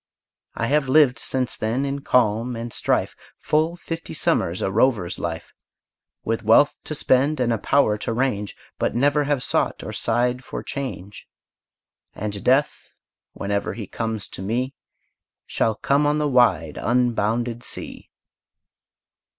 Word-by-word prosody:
I 115 - -1
have 140 +1 +1
lived, 130 -4 +5
since 130 0 0
then, 115 +6 -1
in 140 0 -2
calm 120 -1 +1
and 115 0 -6
strife, - - 0 0.2
Full 155 +3 +1
fifty 165 -1 -7
summers 85 +2 +1
a 95 - 0
rover's 105 -4 +1
life, 85 -1 -5 0.7
With 115 +1 -1
wealth 115 +7 +5
to 155 - -4
spend, 140 +2 +2
and 120 -2 +2
a 115 - -2
power 105 -6 +2
to - - -3
range, 115 -4 -1 0.2
But - - 0
never 145 +3 +2
have 140 -3 0
sought - - 0
or - - -6
sighed 125 +2 0
for - - -6
change: 115 - -6 0.9
And 105 -1 -4
death, 135 +3 +1 0.4
whenever 100 0 -2
he 110 - -5
comes 110 -1 -4
to - - -8
me, 120 +7 -2 0.7
Shall 110 - 0
come 140 +6 +2
on 150 +1 +2
the 150 -1 +1
wide, 120 - +2
unbounded 120 -1 0
sea! - - -8
120 Hz, 140 wpm, -23 LUFS, 110-140 Hz, 0.9 s, lived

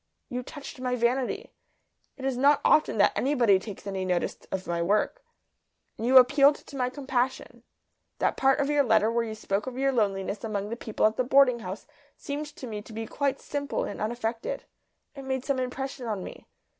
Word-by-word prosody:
You 250 0 -3
touched 280 +1 -9
my 250 -1 0
vanity, 255 - 0 0.7
it 265 - -6
is 270 -2 0
not 280 +3 +4
often 305 -7 +4
that 205 - +4
anybody 245 -8 +3
takes 200 0 -9
any 195 -1 -3
notice 180 -2 0 0.2
of 190 -1 -3
my 170 0 -1
work. 210 - 0 0.7
And 230 - -3
you 260 +1 +7
appealed 275 +3 +7
to 285 - -13
my 250 -2 0
compassion. 260 -1 -2 0.6
That - - +1
part 270 +1 +3
of 280 - +1
your 295 0 +3
letter 220 -2 +3
where 235 0 +1
you 220 -1 -5
spoke 210 +1 -2
of 255 -1 -5
your 270 +1 +2
loneliness 200 -4 -1
among 205 -2 -3
the 230 - -3
people 220 -3 -1
at 215 +1 +2
the 255 - +2
boarding 255 -1 +5
house 190 -1 -7 0.3
seemed 290 +1 -4
to 280 - -10
me 215 -3 -5
to 220 - -13
be 225 +1 -4
quite 280 +3 -1
simple 285 -1 -3
and - - -5
unaffected. 230 - -3 0.5
It 275 - -9
made 265 -1 -3
some 275 -2 0
impression 255 0 -4
on 205 -4 -2
me. - - -10
250 Hz, 195 wpm, -27 LUFS, 215-275 Hz, 0.7 s, you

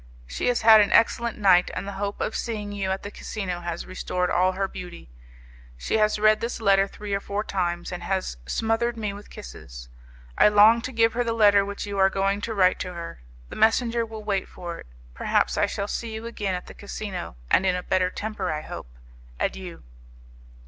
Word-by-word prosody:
She - - -3
has 245 -1 +1
had 220 -1 +9
an 205 - +1
excellent 235 0 +3
night, 185 -3 +5
and - - -4
the - - -3
hope 205 0 -3
of 220 - -2
seeing 210 -3 -3
you 200 -2 -3
at 190 0 -2
the 205 - -6
casino 190 -6 -5
has 170 -1 -4
restored 180 -1 -2
all 185 +1 +3
her 195 +1 -1
beauty. 175 - -10 0.7
She 220 - -1
has 215 0 +3
read 215 0 +4
this 235 +1 -3
letter 195 -2 +4
three 205 0 -7
or 200 - +1
four 200 +1 -3
times, 175 -4 -2
and 180 - -5
has 190 - -2
smothered 225 +1 0
me 210 -2 -3
with 205 +1 -11
kisses. - - -10 0.5
I - - +8
long 210 +3 +6
to 255 - -5
give 230 -2 +3
her 245 +1 0
the 230 -1 -1
letter 205 -3 +5
which 200 +1 -5
you 200 -1 -4
are 190 0 +5
going 195 +1 0
to 225 +1 -3
write 185 -2 +3
to 180 - -4
her. 170 - -7 0.3
The - - -8
messenger 230 +1 +3
will 220 -1 -8
wait 200 -2 -1
for 175 -1 -7
it. - - -12 0.3
Perhaps - - +1
I - - +2
shall 200 - -3
see 225 +1 -4
you 220 +1 -6
again 205 -5 -2
at 180 - -6
the - - -11
casino, 200 - -6 0.2
and - - +5
in 185 -1 +2
a 180 - -3
better 185 0 +1
temper, 205 -3 -4
I 155 0 -3
hope. - - -8 0.5
Adieu." - - -4
200 Hz, 210 wpm, -25 LUFS, 185-220 Hz, 0.7 s, had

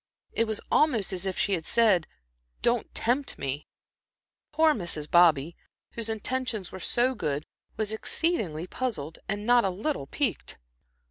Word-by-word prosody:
It 230 - +1
was 220 -2 -2
almost 230 - +3
as 185 +1 -2
if 190 - -3
she 200 - +1
had 170 -4 -1
said, 205 -5 +3 0.6
"Don't 235 -1 +1
tempt 260 +4 +1
me." 140 +2 -4 0.8
Poor 315 +1 +4
Mrs. 170 - -3
Bobby, 165 -2 +4 0.4
whose 230 -1 -2
intentions 225 -2 -2
were 190 - -7
so 245 +6 +2
good, 150 - -2 0.3
was 215 -1 -1
exceedingly 215 - -1
puzzled 185 - -4
and 205 +1 -2
not 240 0 +5
a 195 - +1
little 195 - -3
piqued. 270 - -1
210 Hz, 145 wpm, -27 LUFS, 170-245 Hz, 0.8 s, not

